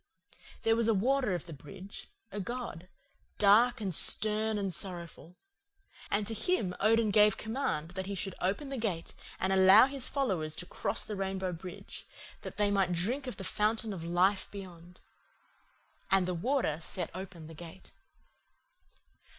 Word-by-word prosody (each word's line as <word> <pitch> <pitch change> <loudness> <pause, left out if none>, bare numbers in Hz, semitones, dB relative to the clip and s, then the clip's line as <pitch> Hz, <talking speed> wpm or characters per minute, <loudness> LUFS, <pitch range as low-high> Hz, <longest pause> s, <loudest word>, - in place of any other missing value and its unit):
"There 225 0 +4
was 230 -1 +2
a 225 - +3
Warder 250 0 +1
of 175 - -5
the 165 - -9
bridge, 165 +8 -10 0.2
a 205 - -5
god, 200 -5 -6 0.5
dark 220 +5 +5
and 195 -4 -2
stern 215 +5 +4
and 195 -2 -2
sorrowful. 175 -2 -7 0.7
And 205 +1 +1
to 225 - 0
him 225 - 0
Odin 225 0 +3
gave 210 -1 +5
command 220 - -2
that 190 +1 -5
he 200 - -3
should 195 0 -3
open 200 +10 -1
the 270 -2 -4
gate 190 -7 -3 0.3
and 190 0 +1
allow 190 +4 +8
his 270 -1 -1
followers 185 - 0
to - - -5
cross - - -3
the 210 - -5
Rainbow 190 -1 -2
Bridge, 175 +1 -9 0.3
that - - -8
they 205 -1 +2
might 195 -3 +2
drink 240 +11 -1
of 250 - -5
the 195 - -6
fountain 215 +2 0
of 175 -4 -7
life 180 +4 +1
beyond. 180 -3 -11 1.1
And 190 -2 +3
the 180 - -1
Warder 175 - 0
set 175 +1 -3
open 185 -3 -8
the 160 - -10
gate. 170 +3 -12
195 Hz, 160 wpm, -31 LUFS, 180-220 Hz, 1.1 s, allow